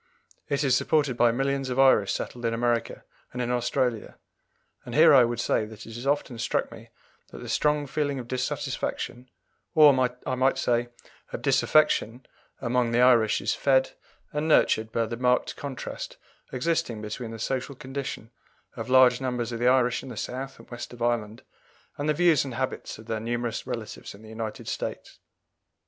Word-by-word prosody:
It 140 0 0
is 130 -3 +3
supported 145 -1 +1
by 120 0 +4
millions 135 +2 -1
of 125 - -3
Irish 130 -7 +5
settled 120 - -4
in 115 0 0
America 120 -1 -1 0.3
and 125 - -7
in 125 0 -1
Australia; 120 -1 -1 0.7
and 120 - -7
here 155 0 +7
I 130 -3 +8
would 120 0 -1
say 120 - +1
that 110 0 -11
it 115 - -10
has 120 +4 -6
often 140 -4 -1
struck - - -1
me - - -12 0.4
that - - -11
the - - -8
strong 150 -1 +1
feeling 145 0 -2
of 125 -2 -6
dissatisfaction, 125 0 -3 0.5
or, 150 -2 +8 0.3
I - - -1
might 130 +1 +2
say, 120 0 0 0.4
of - - -6
disaffection, 130 -2 +2 0.3
among 120 0 +1
the 120 - +3
Irish 115 -4 +4
is - - 0
fed 130 -1 +2 0.4
and 150 +1 -1
nurtured 110 -7 +3
by 115 0 0
the 115 +1 -5
marked 125 0 +1
contrast 140 -3 -6 0.3
existing 125 -5 -1
between 110 +2 -5
the 115 - -7
social 130 +4 -3
condition 130 -3 -6 0.4
of 115 0 -6
large 130 -1 +6
numbers 125 -2 -2
of 115 - -4
the 120 - +2
Irish 125 -1 +3
in - - -9
the 120 - -8
South 135 +4 -5
and - - -15
West 120 0 -7
of 120 -1 -6
Ireland 115 -2 -1 0.6
and 145 +1 -1
the 150 - +2
views 165 -4 +4
and 130 -4 -6
habits 130 +1 -4
of 110 - -13
their 110 -1 -3
numerous 120 0 -3
relatives - - -6
in 105 - -16
the 110 - -12
United 110 -1 -6
States. - - -5
125 Hz, 180 wpm, -26 LUFS, 115-135 Hz, 0.7 s, I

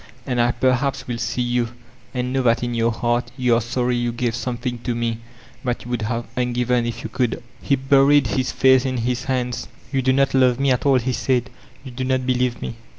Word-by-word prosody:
And 125 -2 0
I 120 +1 +3
perhaps 130 +2 0
will 120 -2 -3
see 125 - -1
you, 120 -1 0 0.4
and 125 0 -2
know 135 - +1
that 120 -1 +2
in 120 0 -2
your 115 0 +2
heart 120 +1 -1
you 125 -2 +2
are 115 - +3
sorry 120 +2 -1
you 120 0 0
gave 120 0 -1
something 120 +1 -3
to 120 0 -3
me 115 -1 -2 0.4
that 125 -3 -2
you 120 - -7
would 120 -2 -1
have 115 +2 -2
uQgtven 125 -1 0
if 120 - -5
you 115 - -5
could/' 125 -2 0 0.2
He 140 - +2
buried 135 +2 +4
his 130 -2 -1
face 130 -1 +4
in 130 -1 -1
his 120 +2 -1
hands. 125 -2 -2 0.3
^Tou 135 -1 +1
do 130 - +3
not 135 +1 +2
love 130 -2 +4
mt 140 -1 +2
at 125 - -3
an, 135 -2 +5
he 130 +2 -1
said. 125 0 0 0.3
''You 130 - -7
do 130 - -3
not 130 0 0
believe 125 -1 0
me.'' 115 - -5
125 Hz, 225 wpm, -21 LUFS, 120-130 Hz, 0.4 s, an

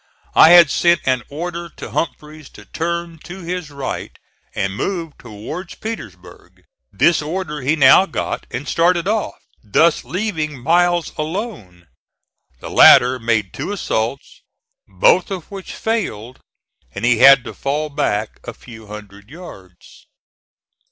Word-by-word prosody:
I 160 - +7
had 170 -4 +7
sent 170 0 +2
an 130 -1 +1
order 170 +3 -6
to - - -8
Humphreys 150 0 -5
to - - -14
turn 170 0 -4
to 175 +5 -10
his 175 -2 -5
right 140 -2 -6 0.4
and 95 0 -2
move 165 - -4
towards 120 - -8
Petersburg. 95 - -10 0.3
This 155 - +2
order 150 -1 -5
he 140 +5 +1
now 150 +6 +6
got, - - -4
and 145 - -6
started 170 +1 +1
off, 215 0 -1 0.3
thus 155 +10 +2
leaving 165 -7 -3
Miles 175 +5 +1
alone. 155 - -6 0.8
The - - -8
latter 125 +1 +6
made 110 -5 -1
two - - -5
assaults, 140 - -3 0.5
both - - +2
of 190 -3 -7
which 195 -2 -8
failed, 130 - -3 0.6
and 105 - -3
he 120 -2 +3
had 135 0 +7
to - - -8
fall 150 +2 -3
back 110 -8 -2
a 120 - -8
few 110 -3 -14
hundred 105 0 -12
yards. 95 - -14
155 Hz, 135 wpm, -18 LUFS, 120-175 Hz, 0.8 s, I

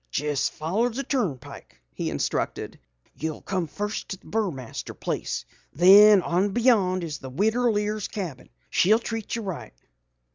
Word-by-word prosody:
"Jes' 145 -1 0
follow 195 +11 -1
the 255 +4 -4
turnpike," 185 - -4
he - - -3
instructed. - - -3 0.3
"You'll 160 -1 -5
come 185 -3 -2
fust 205 +6 -4
to 190 - -4
the - - -27
Burmaster 175 - -4
place. - - -3 0.3
Then 195 +4 +8
on 190 +3 +1
beyond 205 -7 +3
is 150 -4 -5
the 130 - -8
Widder 220 - +1
Lear's 210 -1 -1
cabin. 175 -11 -6 0.2
She'll 210 +5 +4
treat 225 -2 -4
you 230 - -4
right." 185 - -6
195 Hz, 145 wpm, -25 LUFS, 165-220 Hz, 0.3 s, Then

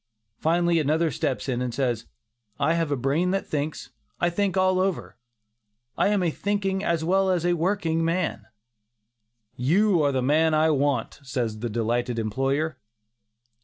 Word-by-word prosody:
Finally 170 +1 +2
another 155 +2 +1
steps 140 0 -2
in, 125 -2 -1
and 125 -2 -3
says, 120 -4 -1 0.5
"I 160 - +2
have 165 -2 0
a 145 - 0
brain 140 +8 +1
that 195 +1 -1
thinks; 150 +1 -4 0.3
I 175 - +1
think 195 +1 0
all 185 0 +3
over; 190 -1 -2 0.8
I - - +2
am 205 -2 +1
a 170 - +1
thinking 195 +1 -1
as 170 -4 0
well 190 +3 +2
as 175 -2 +1
a 175 - +3
working 165 -2 0
man!" 165 - -1 1.1
"You 175 - +3
are 145 - +3
the 130 -2 0
man 155 +4 +3
I 155 +1 +3
want," 145 0 0
says 125 -5 -3
the 120 +1 -3
delighted 120 +2 -1
employer. 135 +7 -1
160 Hz, 160 wpm, -25 LUFS, 135-180 Hz, 1.1 s, all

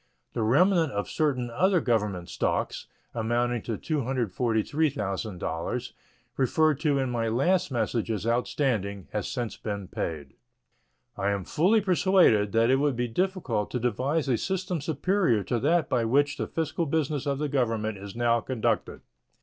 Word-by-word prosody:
The - - -2
remnant 165 - +3
of 100 0 -2
certain 130 -6 -1
other 185 +8 +3
Government 105 - 0
stocks, - - -2 0.3
amounting 120 +1 0
to 115 -1 -4
$243,000, 115 - -1 0.5
referred 150 +2 +2
to 150 -3 +1
in 130 -2 0
my 115 -1 -1
last 175 +11 +2
message 115 -2 -1
as 110 -2 -2
outstanding, 115 -5 -1
has 105 - -2
since 120 -3 -4
been 100 -3 -5
paid. 80 -5 -5 0.8
I 100 - -1
am 100 -2 -1
fully 190 - +3
persuaded 180 - +4
that 115 +2 +4
it 135 - +4
would 140 -1 +1
be 120 +1 -1
difficult 180 - -1
to - - -2
devise 130 +6 0
a 125 -3 +2
system 185 -1 -2
superior 155 - +1
to 120 +2 -1
that 160 +7 +2
by 120 -2 +1
which 145 +5 +2
the - - -2
fiscal 165 +1 -2
business 145 -1 -1
of 140 -1 0
the 150 +1 -1
Government 115 -6 -1
is 100 +1 -9
now 120 0 +2
conducted. 125 -1 -1
125 Hz, 150 wpm, -27 LUFS, 110-155 Hz, 0.8 s, persuaded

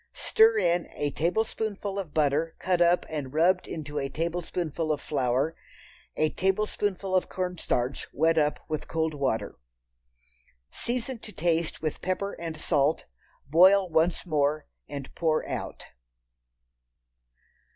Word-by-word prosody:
Stir 445 0 +4
in 175 - +2
a 145 -1 -1
tablespoonful 205 +3 -1
of 180 -6 -5
butter 155 +2 +1
cut 180 -2 0
up 175 +1 +4
and 145 -3 -5
rubbed 180 +3 +3
into 150 -2 -4
a 135 -1 -2
tablespoonful 165 0 -2
of 150 - 0
flour. 135 +3 0 0.6
A 155 0 +2
tablespoonful 195 0 -1
of 185 - +1
cornstarch 180 -8 -2
wet 160 +2 +2
up 150 -2 +2
with 155 -1 -3
cold 160 -1 -1
water. 135 - -2 1.1
Season 245 +1 -3
to 215 - -10
taste 165 -3 -1
with 155 - -2
pepper 185 +2 -2
and 165 -2 -5
salt, 150 -1 +1 0.4
boil 185 +6 +6
once 165 +1 +1
more 150 -2 +1 0.2
and 140 -2 -7
pour 160 -2 0
out. - - -5
165 Hz, 125 wpm, -27 LUFS, 150-185 Hz, 1.1 s, boil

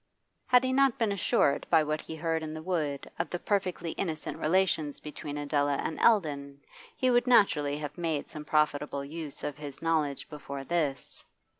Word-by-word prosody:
Had 250 0 +6
he 260 0 0
not 275 -1 +4
been 225 -5 +1
assured 170 -7 +2
by 160 -2 +5
what 155 +1 -2
he 160 - -8
heard 160 0 -1
in 155 0 -5
the 155 - -6
wood 155 -6 -2
of - - -1
the 175 - -2
perfectly 180 -3 -1
innocent 160 -4 -4
relations 160 -3 +1
between 150 -1 -6
Adela 145 -1 +1
and 160 - -3
Eldon, 145 -10 +2 0.4
he 255 -1 +2
would 245 +1 +3
naturally 150 -12 +4
have 150 +3 -6
made 160 -4 -1
some 150 - -8
profitable 150 -2 0
use 155 -1 -6
of 145 - -3
his 145 -2 -8
knowledge 155 -4 0
before 140 -2 -7
this. 145 -5 -2
155 Hz, 175 wpm, -29 LUFS, 145-175 Hz, 0.4 s, Had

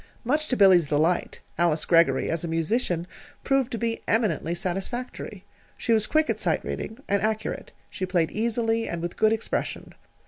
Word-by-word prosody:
Much 300 +5 0
to 250 - 0
Billy's 185 -6 +6
delight, 155 +5 0 0.2
Alice 170 -2 +2
Greggory, 165 -6 +4
as 165 0 -2
a - - -2
musician, 165 +2 0 0.4
proved 270 -2 +1
to 230 - -2
be 230 0 -2
eminently 195 -7 +1
satisfactory. 195 +8 -4 0.3
She 230 - +1
was 215 -1 +2
quick 310 +1 +2
at - - -1
sight - - 0
reading, 220 - -5
and 200 -1 +1
accurate. 215 +1 -2 0.2
She 185 - -4
played 175 -3 +1
easily, 225 0 0
and 170 - -3
with 175 - -4
good 215 - +3
expression. 225 0 -3
205 Hz, 170 wpm, -26 LUFS, 170-230 Hz, 0.4 s, Billy's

